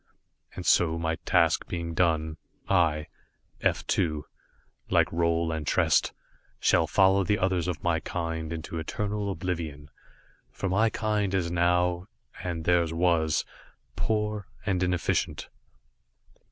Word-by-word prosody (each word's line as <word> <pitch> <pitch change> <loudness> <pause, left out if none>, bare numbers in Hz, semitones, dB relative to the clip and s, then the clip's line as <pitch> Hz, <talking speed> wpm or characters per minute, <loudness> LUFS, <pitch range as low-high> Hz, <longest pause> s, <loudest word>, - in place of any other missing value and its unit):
And - - -6
so 80 -2 +4
my 80 0 -1
task - - +3
being 85 -1 -4
done, 80 -2 +1 0.3
I, 80 -5 +2 0.6
F - - +1
2, 75 -4 0 0.6
like - - +4
Roal 85 0 +1
and 75 -2 -5
Trest, - - +3 0.5
shall - - +3
follow 95 0 +4
the 105 +3 +1
others 90 -3 0
of 90 -2 -3
my 85 -1 +2
kind 80 -2 -4
into 80 0 -5
eternal 105 +5 -3
oblivion, 80 -7 -4 0.6
for 100 - -4
my 110 +5 +3
kind 105 -4 -1
is 85 -3 0
now, 90 +1 +1 0.4
and 85 -3 -4
theirs 85 -2 +3
was, 80 -2 +2 0.5
poor 105 +2 -1 0.2
and 95 -2 0
inefficient. 90 -1 -1
85 Hz, 125 wpm, -27 LUFS, 80-95 Hz, 0.6 s, so